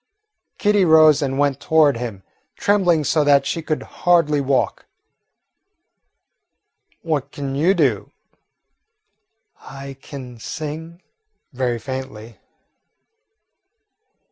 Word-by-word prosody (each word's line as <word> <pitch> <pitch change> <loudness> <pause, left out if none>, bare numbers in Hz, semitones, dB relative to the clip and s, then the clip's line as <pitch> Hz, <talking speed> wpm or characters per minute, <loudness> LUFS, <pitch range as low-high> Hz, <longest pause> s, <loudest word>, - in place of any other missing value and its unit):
Kitty 205 -2 +2
rose 155 -3 +6
and 135 -1 -2
went 140 -1 +1
toward 155 -3 +3
him, 115 -5 -6 0.3
trembling 180 -6 +2
so 150 +2 +1
that 140 -1 +4
she 165 +4 -2
could 155 -1 -3
hardly 165 -5 +1
walk. 135 -1 -1 2.2
"What 155 -5 -2
can 140 -2 -5
you 165 +8 +2
do?" 135 - 0 1.5
"I 135 0 -10
can 125 -4 -10
sing," 160 +7 -7 0.5
very 125 -2 -1
faintly. 125 -3 -8
145 Hz, 90 wpm, -20 LUFS, 130-160 Hz, 2.2 s, rose